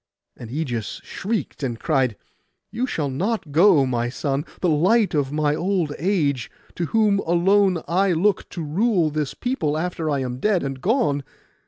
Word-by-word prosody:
And 115 - -10
Ægeus 125 -5 -3
shrieked, 215 -4 -4
and 120 -4 -3
cried, 130 -8 +1 0.6
'You 240 +5 -1
shall 145 - -2
not 185 - -2
go, 155 -3 +5
my 120 -2 -1
son, 140 +2 -2
the 180 - +1
light 190 +8 +3
of 140 -3 0
my 150 -1 +1
old 175 -2 0
age, 150 - 0 0.3
to 175 - 0
whom 210 -1 +2
alone 185 0 +2
I 185 +2 +2
look 195 +5 +1
to 170 - -5
rule 175 +1 +1
this 150 -2 -2
people 165 - -1
after 165 -1 -2
I 140 -2 0
am 125 -1 -4
dead 200 +1 +1
and 135 -1 -4
gone. 185 - +1
160 Hz, 165 wpm, -23 LUFS, 140-195 Hz, 0.6 s, go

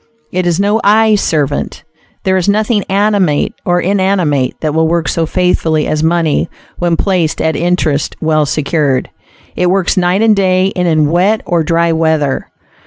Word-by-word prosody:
It 180 0 -1
is 175 0 0
no 205 +3 +1
"eye 220 +1 +4
servant." 150 -8 -1 0.4
There 190 0 +1
is 185 +1 0
nothing 215 0 +1
animate 195 -6 +1
or 175 0 +1
inanimate 180 -8 0
that 155 -2 -1
will 160 0 +2
work 170 0 -1
so 165 -1 -1
faithfully 165 -3 0
as 155 - -1
money 165 0 0 0.3
when 175 -2 0
placed 180 -5 0
at 160 -1 0
interest, 165 -3 -1
well 155 -2 +1
secured. 145 -2 -1 0.4
It 180 - +1
works 190 +1 0
night 185 +3 +2
and 220 -2 +4
day, 185 0 +1
and 180 -1 0
in 155 -2 +2
wet 195 +6 +2
or 170 -1 0
dry 170 +1 +1
weather. 160 -4 0
175 Hz, 165 wpm, -13 LUFS, 155-190 Hz, 0.4 s, eye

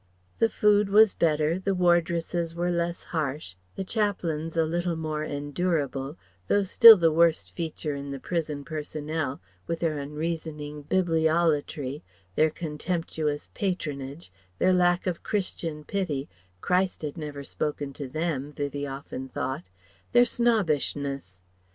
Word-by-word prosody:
The 225 - +4
food 210 -2 +3
was 210 0 +6
better, 155 +1 +2
the 195 0 0
wardresses 170 -1 +1
were 175 +1 0
less 170 0 -1
harsh, 150 - -3 0.2
the - - -3
chaplains 175 -7 -1
a 165 - +4
little 170 +1 -1
more 155 -1 -3
endurable, 145 -1 -2 0.3
though 205 - +3
still 225 +3 +10
the 165 -2 +3
worst 165 0 +3
feature 160 -3 -4
in 140 0 -6
the 140 -1 -5
prison 150 -3 -3
personnel, 155 -2 -3 0.3
with 165 - -1
their 155 -3 0
unreasoning 150 0 -4
Bibliolatry, 160 -5 +1 0.3
their 155 +10 +4
contemptuous 155 -1 -3
patronage, 150 - -4 0.3
their 185 - +4
lack 175 -1 +3
of 180 -3 -2
Christian 165 -6 -3
pity 155 -7 -2 0.3
Christ 180 -1 +1
had 150 -2 -3
never 150 -3 -6
spoken 145 0 -3
to 140 0 -6
them, 150 -1 -2
Vivie 145 0 -3
often 135 -1 -6
thought 130 - -4 0.4
their 245 0 +7
snobbishness. 145 - 0
160 Hz, 130 wpm, -27 LUFS, 145-175 Hz, 0.4 s, still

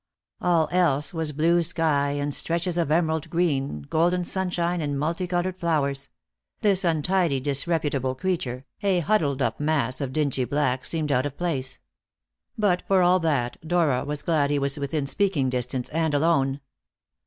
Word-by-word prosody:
All 170 -3 +2
else 170 -2 +2
was 160 -2 -1
blue 165 +4 +2
sky 155 -4 +1
and 145 0 -2
stretches 170 +3 0
of 170 -4 0
emerald 160 -1 +1
green, 140 - -1
golden 175 - +1
sunshine, 175 -2 -1
and 145 -2 -2
multicoloured 175 +4 -2
flowers; 140 -5 -1 0.5
this 195 -3 +3
untidy, 170 -2 +1
disreputable 140 -1 -1
creature, 135 -6 -3 0.2
a 195 -4 +2
huddled 150 -8 +1
up - - -1
mass 145 -3 0
of 135 -2 -3
dingy 140 -3 0
black, 130 -2 0
seemed 155 -3 -1
out 130 +2 +2
of 145 - -10
place. 135 -7 -2 0.8
But, 200 -4 +2
for 190 -2 +4
all 180 +1 +4
that, 140 -8 0
Dora 160 -6 +1
was 145 0 -5
glad 155 -4 +1
he 145 - +1
was 140 +1 -1
within 140 +1 -2
speaking 145 -5 0
distance, 125 0 -2
and 160 -1 0
alone. 140 -3 +1
155 Hz, 155 wpm, -25 LUFS, 140-175 Hz, 0.8 s, for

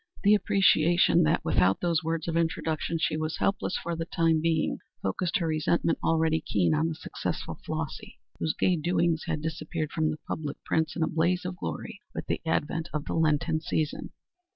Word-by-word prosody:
The 205 +1 +6
appreciation 175 -5 +4
that 155 - +1
without 95 +1 +3
those 170 -2 +1
words 165 0 -2
of 165 - -1
introduction 165 0 0
she 160 - +1
was 155 0 -2
helpless 195 -1 0
for 170 0 -3
the 165 0 -3
time 165 -2 +2
being 160 -1 +1 0.2
focused 130 - 0
her 170 - -1
resentment, 160 +1 +1
already 160 -1 +2
keen, 90 - +1
on 75 +1 +2
the 80 - -3
successful - - -5
Flossy, - - -5 0.2
whose 155 - 0
gay 180 -2 +3
doings 170 0 +1
had 160 -2 -2
disappeared 160 0 -3
from 155 -1 +1
the 155 - -3
public 150 -3 -4
prints 160 0 0
in 165 - 0
a - - +2
blaze 175 +3 +1
of 180 0 -3
glory 80 - -5
with - - -4
the - - -2
advent 160 +1 -1
of 150 -1 -3
the - - -3
Lenten 155 -1 +2
season. 155 -2 -2
160 Hz, 185 wpm, -28 LUFS, 155-170 Hz, 0.2 s, The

